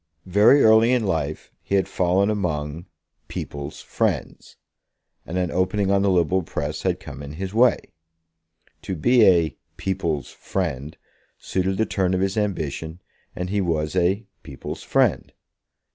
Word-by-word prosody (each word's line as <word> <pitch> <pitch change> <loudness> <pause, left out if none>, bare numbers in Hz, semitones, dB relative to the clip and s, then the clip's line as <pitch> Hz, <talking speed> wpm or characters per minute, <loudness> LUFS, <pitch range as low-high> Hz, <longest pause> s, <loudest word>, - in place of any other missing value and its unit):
Very 105 +9 +5
early 110 +2 +6
in 125 -3 +2
life 80 -5 -2
he 100 - -2
had 95 - +2
fallen 95 +3 +1
among 85 -4 -3 0.4
"people's 70 0 -6
friends," - - -3 0.7
and 90 - -3
an 90 -2 0
opening 95 +2 +1
on 100 0 +3
the 100 - +2
liberal 90 0 +2
press 80 - -4
had - - 0
come 70 0 -9
in 70 0 -8
his 95 +4 -5
way. 120 +3 +3 0.9
To 95 - -4
be 120 +8 +4
a 85 -6 +3 0.2
"people's 85 -7 -2
friend" 75 -6 -4 0.4
suited 95 +1 -1
the 110 - +2
turn 95 -3 0
of - - 0
his 95 0 0
ambition, 80 -5 -3 0.4
and 90 +1 -4
he 100 0 +1
was 80 -2 -1
a 95 +5 +1 0.2
"people's 70 -3 -8
friend." - - +1
90 Hz, 145 wpm, -23 LUFS, 80-100 Hz, 0.9 s, early